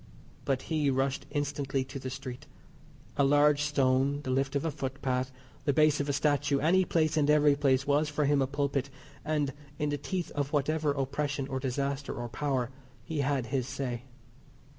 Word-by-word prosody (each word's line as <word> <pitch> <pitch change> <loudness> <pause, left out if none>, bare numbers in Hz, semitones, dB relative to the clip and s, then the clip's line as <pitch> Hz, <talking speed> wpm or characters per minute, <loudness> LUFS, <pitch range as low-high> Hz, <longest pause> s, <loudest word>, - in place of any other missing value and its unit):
But 135 -1 0
he 155 -3 +1
rushed 135 +1 0
instantly 140 -2 -1
to 135 +1 -7
the 130 - -5
street. 125 -1 -7 0.7
A 140 - +4
large 145 +1 +4
stone, 140 -1 +2
the 130 - -2
lift 135 +1 0
of 140 - 0
a 160 - 0
footpath, 130 -2 -2 0.3
the 145 - +3
base 155 0 +4
of 145 0 -1
a - - +3
statue, 145 0 +2
any 180 +6 +3
place 160 -2 +1
and 150 -1 +3
every 150 -1 +5
place 135 -2 +2
was 145 +1 +2
for 150 0 0
him 145 0 +3
a 135 - +2
pulpit; 140 -1 -1 0.3
and, 150 -3 0 0.2
in 150 - 0
the 145 0 -2
teeth 180 +3 -3
of 145 0 -2
whatever 150 +1 +1
oppression 140 0 -2
or 130 -1 -2
disaster 140 +2 -2
or 120 -2 -5
power, 130 -1 -1 0.3
he 160 -3 -2
said 135 -3 0
his 130 +1 -1
say. 125 -3 -4
140 Hz, 185 wpm, -30 LUFS, 135-145 Hz, 0.7 s, every